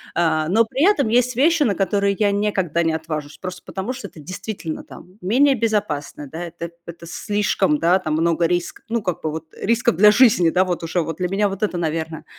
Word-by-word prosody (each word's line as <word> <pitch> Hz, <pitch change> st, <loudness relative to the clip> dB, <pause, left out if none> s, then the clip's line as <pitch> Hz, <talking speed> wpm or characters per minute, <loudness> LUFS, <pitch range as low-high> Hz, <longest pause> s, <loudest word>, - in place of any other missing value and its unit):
А, 160 Hz, -2 st, +1 dB
но 225 Hz, +4 st, +4 dB
при 260 Hz, +6 st, -1 dB
этом 280 Hz, -, +1 dB
есть 245 Hz, +1 st, +2 dB
вещи, 320 Hz, +5 st, +3 dB
на 215 Hz, -8 st, +2 dB
которые 200 Hz, +1 st, +1 dB
я 205 Hz, -2 st, +2 dB
никогда 195 Hz, -5 st, 0 dB
не 165 Hz, -1 st, +1 dB
отважусь. 155 Hz, -2 st, -5 dB
Просто 180 Hz, -1 st, -7 dB
потому 195 Hz, +7 st, -4 dB
что 260 Hz, -, -7 dB
это -, -, -15 dB
действительно 185 Hz, +1 st, -6 dB
там 180 Hz, +4 st, -14 dB
менее 260 Hz, +9 st, +4 dB
безопасно, 205 Hz, -, -2 dB
да, 160 Hz, +5 st, -6 dB
это 170 Hz, 0 st, -7 dB, 0.2 s
это 170 Hz, 0 st, -9 dB
слишком, 195 Hz, -3 st, 0 dB
да, 175 Hz, +4 st, +3 dB
там 155 Hz, -4 st, -3 dB
много 165 Hz, +1 st, +2 dB
риска, 175 Hz, 0 st, -2 dB
ну 230 Hz, -1 st, -1 dB
как 180 Hz, -3 st, -2 dB
бы 155 Hz, -, -2 dB
вот 160 Hz, +1 st, -5 dB
рисков 230 Hz, +2 st, +1 dB
для 210 Hz, +5 st, +7 dB
жизни, 210 Hz, -8 st, +5 dB
да, 185 Hz, +3 st, +3 dB
вот 175 Hz, -2 st, -2 dB
уже 165 Hz, +2 st, 0 dB
вот 165 Hz, 0 st, -4 dB
для 180 Hz, -1 st, -1 dB
меня 200 Hz, +1 st, +1 dB
вот 195 Hz, +1 st, -6 dB
это, 200 Hz, -4 st, 0 dB
наверно, 160 Hz, -1 st, -3 dB
185 Hz, 215 wpm, -21 LUFS, 165-210 Hz, 0.2 s, для